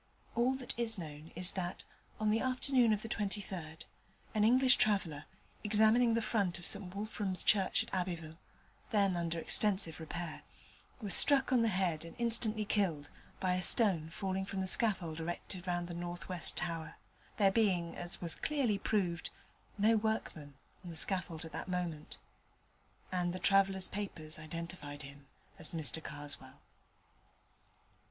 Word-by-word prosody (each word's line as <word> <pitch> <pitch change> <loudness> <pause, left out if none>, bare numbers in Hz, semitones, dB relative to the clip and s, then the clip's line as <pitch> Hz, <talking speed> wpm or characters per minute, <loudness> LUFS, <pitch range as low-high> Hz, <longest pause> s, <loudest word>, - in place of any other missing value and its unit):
All 245 +3 +1
that 260 -1 -5
is 225 -2 +3
known 155 -2 -9
is 180 +1 +4
that, 180 -2 -4 0.4
on 215 -1 +1
the 220 - +2
afternoon 255 -2 +2
of 215 -1 0
the - - -5
23rd, 195 -7 -4 0.5
an 215 - +1
English 250 +3 +5
traveller, 190 -9 0 0.4
examining 220 +2 +3
the 230 - 0
front 200 -6 0
of 175 - -10
St 195 -2 +3
Wulfram's 205 -2 +1
Church 195 -3 +2
at - - -15
Abbeville, 170 -3 -4 0.5
then 200 -4 +2
under 170 -1 -2
extensive 190 -1 +2
repair, 165 +1 -6 0.6
was 200 - 0
struck 275 -2 +6
on 245 - +4
the 230 - +2
head 185 -6 -1
and 165 - -11
instantly 225 -2 +2
killed 175 -9 -1 0.3
by 185 -1 0
a 180 - -1
stone 180 -6 +4
falling 190 +2 -3
from 195 0 -5
the 190 - -1
scaffold 185 -5 +2
erected 175 +2 -6
round 175 -1 -2
the 175 - -7
north 175 0 -6
western 180 -3 -1
tower, 165 -2 -6 0.4
there 195 -2 +4
being, 185 -6 +1
as 175 0 -3
was 170 -2 -3
clearly 255 -9 -1
proved, 180 -6 -1 0.5
no 215 +2 +3
workman 210 -10 -3 0.3
on 180 - -9
the 165 - -8
scaffold 170 -1 0
at 160 - -9
that - - -6
moment: 175 -4 -4 0.9
and 175 -1 -1
the - - -4
traveller's 195 0 +2
papers 170 -6 -5
identified 155 -2 -7
him 140 0 -13 0.3
as 160 - +6
Mr 160 -1 +3
Karswell. 145 -1 -7
185 Hz, 155 wpm, -33 LUFS, 165-215 Hz, 0.9 s, struck